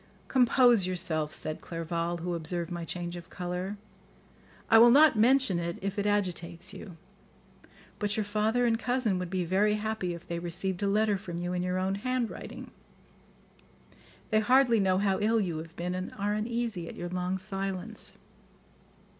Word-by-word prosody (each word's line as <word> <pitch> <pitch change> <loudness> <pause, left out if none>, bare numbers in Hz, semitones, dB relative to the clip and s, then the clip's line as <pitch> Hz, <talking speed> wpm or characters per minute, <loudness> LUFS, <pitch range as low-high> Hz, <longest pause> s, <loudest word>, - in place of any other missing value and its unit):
"Compose 245 -5 +5
yourself," 160 -4 -1
said 155 0 -3
Clerval, 170 +1 -3
who 175 0 -2
observed 170 +1 -2
my 175 -1 -4
change 175 +1 -4
of 175 0 -10
colour, 180 +3 -4 0.9
"I 225 - +7
will 235 +1 +9
not 295 +2 +7
mention 245 -3 +4
it 170 +1 -3
if 200 +1 -3
it 205 - 0
agitates 180 -3 -1
you; 190 -3 -10 1.0
but 210 0 -1
your 215 - +1
father 215 +4 +1
and 225 -1 +2
cousin 245 -7 0
would 180 -1 -4
be 185 -1 -1
very 205 +4 +2
happy 210 -4 -2
if 170 - -12
they 170 0 -3
received 175 +2 -2
a 200 - +1
letter 210 0 +2
from 175 -3 -6
you 175 +1 -3
in 180 - -1
your 180 0 -1
own 190 +1 0
handwriting. 255 -2 -4 1.6
They 215 - +4
hardly 245 +1 +4
know 190 -2 +2
how 195 -1 +1
ill 220 +2 +2
you 175 -6 -2
have 165 +1 -10
been 180 +1 -3
and 185 0 -4
are 205 +1 0
uneasy 220 -4 -2
at - - -9
your 175 - -5
long 180 +1 -2
silence." 195 +2 -4
190 Hz, 170 wpm, -29 LUFS, 175-215 Hz, 1.6 s, will